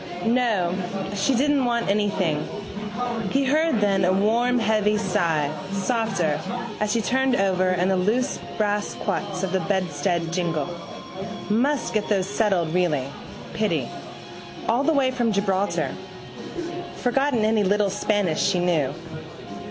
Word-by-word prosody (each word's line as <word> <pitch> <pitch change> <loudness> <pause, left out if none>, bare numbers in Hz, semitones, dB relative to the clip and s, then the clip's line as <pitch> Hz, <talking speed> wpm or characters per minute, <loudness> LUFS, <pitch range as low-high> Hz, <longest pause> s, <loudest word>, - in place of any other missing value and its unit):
No. 225 -7 +2 0.4
She 205 +7 +2
didn't 280 +2 +2
want 235 -1 0
anything. 195 -6 +1 0.8
He 275 +5 +2
heard 305 -3 +2
then 195 -2 +2
a 180 - +4
warm 230 +6 +2
heavy 215 -2 +2
sigh, 170 -8 +1 0.2
softer, 195 -7 0 0.4
as 210 0 0
she 230 - +2
turned 260 +1 +2
over 185 -3 +2
and 185 +1 +2
the 190 - +2
loose 225 +9 +1 0.2
brass 205 -1 0
quoits 195 -2 -3
of 190 - -1
the 190 - +1
bedstead 180 -2 -1
jingled. 175 -1 -1 0.8
Must 265 +5 +1
get 215 -2 0
those 195 -3 +2
settled 195 -6 +1
really. 155 -7 +1 0.4
Pity. - - 0 0.8
All 235 +4 +2
the 320 - +3
way 270 -3 +3
from 240 -3 0
Gibraltar. 200 -1 0 1.0
Forgotten 250 -2 +1
any 215 -1 +3
little 200 0 +2
Spanish 205 -4 0
she 195 -2 +2
knew. 170 -6 +1
205 Hz, 130 wpm, -24 LUFS, 180-235 Hz, 1.0 s, a